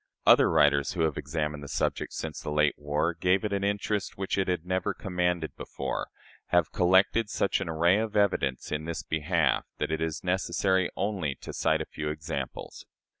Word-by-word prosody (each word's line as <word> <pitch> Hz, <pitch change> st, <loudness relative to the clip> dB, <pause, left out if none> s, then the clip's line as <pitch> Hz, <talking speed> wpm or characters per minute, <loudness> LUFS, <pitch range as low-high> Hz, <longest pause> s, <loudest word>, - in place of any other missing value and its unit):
Other -, -, +7 dB
writers, 70 Hz, -1 st, +3 dB
who 90 Hz, -, -2 dB
have 80 Hz, -2 st, +1 dB
examined 75 Hz, -2 st, -3 dB
the 70 Hz, -, -8 dB
subject -, -, -1 dB
since -, -, -5 dB
the -, -, -5 dB
late 75 Hz, -1 st, +3 dB
war 75 Hz, +3 st, -1 dB
gave 90 Hz, +5 st, +1 dB
it 105 Hz, -, -1 dB
an 100 Hz, 0 st, -1 dB
interest 100 Hz, 0 st, -1 dB
which 95 Hz, 0 st, -1 dB
it 95 Hz, -1 st, 0 dB
had 90 Hz, -2 st, -1 dB
never 95 Hz, 0 st, -1 dB
commanded 90 Hz, -4 st, -1 dB
before, -, -, -4 dB, 0.4 s
have 90 Hz, -3 st, +2 dB
collected 95 Hz, +5 st, +3 dB
such 100 Hz, -, 0 dB
an 95 Hz, -, -3 dB
array 85 Hz, +5 st, +3 dB
of 110 Hz, -1 st, -3 dB
evidence 80 Hz, -11 st, +1 dB
in 75 Hz, +1 st, -2 dB
this 85 Hz, -1 st, -4 dB
behalf 80 Hz, -1 st, +1 dB
that -, -, -2 dB
it 80 Hz, 0 st, -1 dB
is 80 Hz, 0 st, -2 dB
necessary 95 Hz, 0 st, +1 dB
only 95 Hz, -8 st, -1 dB
to -, -, -7 dB
cite -, -, +1 dB
a -, -, -3 dB
few 75 Hz, -1 st, -5 dB
examples. 75 Hz, -3 st, -5 dB
85 Hz, 185 wpm, -28 LUFS, 75-95 Hz, 0.4 s, Other